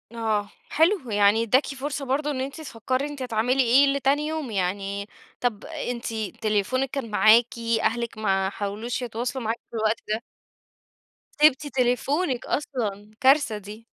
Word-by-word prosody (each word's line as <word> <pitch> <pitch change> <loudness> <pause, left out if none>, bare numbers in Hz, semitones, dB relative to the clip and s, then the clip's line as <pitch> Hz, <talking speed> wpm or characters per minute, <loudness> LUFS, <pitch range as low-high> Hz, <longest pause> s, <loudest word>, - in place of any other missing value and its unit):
آه. 215 -3 -1 0.2
حلو. 325 - +2
يعني 205 +2 +4
إدّاكِ 255 +5 +3
فرصة 275 +1 -4
برضو 285 +3 0
إن 270 -3 -2
أنتِ 275 +4 -5
تفكري 260 0 -2
أنتِ 290 -2 -8
هتعملي 250 +2 +1
إيه 260 +4 +5
لتاني 280 +2 +1
يوم، 310 -5 -3
يعني 200 +1 -2 0.3
طَب 235 -4 -1
أنتِ 245 -7 -5 0.4
تليفونِك 220 +5 0
كان 255 -5 -4
معاكِ، 220 +3 +6 0.4
أهلِك 235 0 -1
ما 195 -3 +1
حاولوش 210 +5 -4
يتواصلوا 245 +2 -3
معاكِ 225 +1 -2
في - - -9
الوقت 220 0 +1
ده؟ 215 +2 -1 1.2
سِبتِ 295 -1 +5
تليفونِك 260 +2 0
أصلًا، 215 -8 -3
كارثة 265 -4 +4
دي. 210 +2 -10
240 Hz, 140 wpm, -25 LUFS, 215-275 Hz, 1.2 s, معاكِ